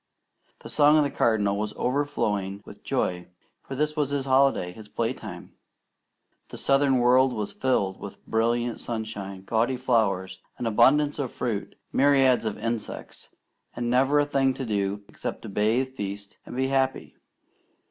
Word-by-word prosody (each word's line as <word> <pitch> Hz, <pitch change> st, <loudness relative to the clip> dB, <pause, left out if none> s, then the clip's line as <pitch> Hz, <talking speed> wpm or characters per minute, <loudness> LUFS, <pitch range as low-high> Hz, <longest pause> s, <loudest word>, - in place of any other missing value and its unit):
The -, -, -9 dB
song 150 Hz, +1 st, +5 dB
of 150 Hz, -, +5 dB
the 140 Hz, -, -1 dB
Cardinal 105 Hz, -3 st, +1 dB
was 105 Hz, 0 st, -3 dB
overflowing 105 Hz, -8 st, -1 dB
with -, -, -13 dB
joy, 90 Hz, -1 st, -1 dB, 0.3 s
for 135 Hz, -, -7 dB
this 150 Hz, +2 st, -1 dB
was 150 Hz, -3 st, 0 dB
his 140 Hz, -1 st, -1 dB
holiday, 135 Hz, -9 st, +3 dB
his 105 Hz, +3 st, -12 dB
playtime. -, -, -4 dB, 0.9 s
The -, -, -9 dB
southern 135 Hz, -1 st, +3 dB
world 125 Hz, +1 st, +4 dB
was 105 Hz, -3 st, -4 dB
filled 100 Hz, -8 st, 0 dB
with 100 Hz, -, -10 dB
brilliant 120 Hz, +1 st, 0 dB
sunshine, 105 Hz, -4 st, -5 dB
gaudy 115 Hz, +5 st, 0 dB
flowers, 100 Hz, -7 st, 0 dB, 0.2 s
an 120 Hz, -, -4 dB
abundance 135 Hz, +7 st, +4 dB
of 130 Hz, -4 st, -2 dB
fruit, 110 Hz, -5 st, -3 dB, 0.2 s
myriads 135 Hz, -3 st, +4 dB
of 110 Hz, -2 st, -2 dB
insects, 115 Hz, 0 st, -5 dB, 0.5 s
and 120 Hz, 0 st, -2 dB
never 135 Hz, +4 st, +4 dB
a 145 Hz, -, +3 dB
thing 135 Hz, -2 st, +1 dB
to 135 Hz, -, -4 dB
do 100 Hz, -2 st, -1 dB
except -, -, -6 dB
to -, -, -7 dB
bathe, 110 Hz, +6 st, +1 dB
feast, 100 Hz, -1 st, -6 dB
and -, -, -8 dB
be 130 Hz, +1 st, 0 dB
happy. 135 Hz, -1 st, 0 dB
120 Hz, 155 wpm, -26 LUFS, 105-135 Hz, 0.9 s, song